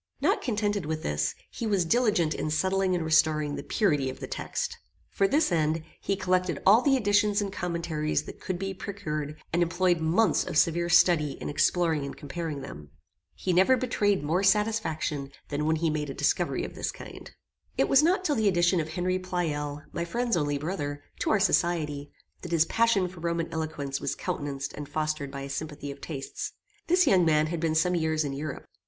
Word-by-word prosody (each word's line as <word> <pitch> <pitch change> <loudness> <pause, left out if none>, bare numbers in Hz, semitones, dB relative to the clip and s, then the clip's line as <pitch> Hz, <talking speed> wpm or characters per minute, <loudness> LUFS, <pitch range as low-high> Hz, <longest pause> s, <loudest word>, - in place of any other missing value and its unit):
Not - - +2
contented 205 - -1
with 155 0 -3
this, 75 0 -1 0.2
he 235 - -4
was 195 -4 +2
diligent 210 -5 +2
in - - -3
settling 190 +3 +1
and 170 -2 -2
restoring 155 -2 +3
the - - -4
purity 150 - +1
of 130 - -8
the - - -5
text. - - -4 0.3
For 195 - +2
this 295 - +2
end, 160 -1 +1 0.2
he 195 - 0
collected 185 -3 0
all 215 +5 +7
the 270 0 +3
editions 205 -2 +2
and 200 -2 -2
commentaries 170 -4 -2
that - - -10
could 185 - -3
be 195 +1 -3
procured, 155 -6 -5
and 175 - +2
employed 175 0 +2
months 175 +8 +3
of - - -3
severe 170 +2 +2
study 160 -4 +4
in - - -6
exploring 160 0 +2
and 140 - -6
comparing 150 0 -5
them. 75 - -9 0.5
He 185 - -1
never 190 +9 +5
betrayed 205 - +1
more 165 +5 +1
satisfaction 190 -9 0 0.2
than 150 +1 -2
when 160 - +3
he 160 0 0
made 150 -1 -2
a 135 - -5
discovery - - 0
of - - -8
this - - -3
kind. - - -10 0.5
It - - +3
was 275 - +6
not 365 +4 +2
till 300 - +2
the 220 -5 +1
addition 175 -1 +3
of 155 0 -2
Henry 185 +2 0
Pleyel, 150 -5 -3
my 170 - -2
friend's 235 +7 -1
only 145 -3 0
brother, 145 -2 -4 0.2
to - - 0
our 215 - +3
society, 155 -7 +1 0.3
that 175 - -7
his 165 -1 +4
passion 225 -2 +2
for 180 -1 -11
Roman 170 0 -2
eloquence 150 -4 -3
was - - -2
countenanced 140 -1 -4
and 145 -1 -7
fostered 155 -2 -2
by 140 0 -6
a 135 - -5
sympathy 145 -1 -5
of 140 0 -11
tastes. 140 -4 -5 0.3
This 360 +2 +4
young 185 -2 +5
man 155 -2 +3
had 170 - -2
been 160 -1 0
some 180 +3 +3
years 160 -2 +1
in 140 -2 -3
Europe. 140 0 -5
170 Hz, 195 wpm, -27 LUFS, 150-195 Hz, 0.5 s, all